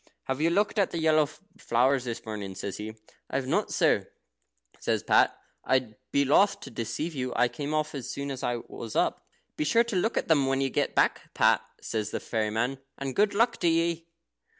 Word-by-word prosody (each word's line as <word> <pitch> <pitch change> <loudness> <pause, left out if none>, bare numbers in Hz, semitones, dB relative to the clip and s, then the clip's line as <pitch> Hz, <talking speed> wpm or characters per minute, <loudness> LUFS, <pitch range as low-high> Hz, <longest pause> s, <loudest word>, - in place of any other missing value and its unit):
Have 130 +2 -3
you 165 - +4
looked 205 +4 +1
at 195 - +3
the - - -4
yellow 155 -2 +3
flowers 135 - 0
this 115 -2 -5
morning?" 105 -3 -5
he 95 - -9
says. 100 +1 -5 0.5
"I - - -6
have 135 -1 0
not, 130 - 0
sir," - - +2 0.7
says - - 0
Pat; - - +4 0.3
"I'd 130 -5 +1 0.2
be 140 0 +3
loth 195 +9 +4
to 135 - -9
deceive 115 +9 -3
you. 130 -3 -3
I 125 - +4
came 140 +5 -5
off 155 0 0
as 135 -4 -5
soon 140 0 -4
as 130 - -5
I 120 - 0
was 115 -2 -8
up." - - 0 0.3
"Be - - +1
sure 230 +11 +4
to 235 -3 -4
look 225 +6 +1
when 135 -4 +3
you 135 -1 0
get - - 0
back, - - +1
Pat," - - +4 0.2
says 110 -2 -2
the - - -3
fairy 110 -2 -1
man, 120 +5 -1 0.2
"and 135 -1 -4
good 205 0 +3
luck 230 +3 +3
to 175 - 0
ye." 165 0 +1
140 Hz, 205 wpm, -28 LUFS, 120-165 Hz, 0.7 s, you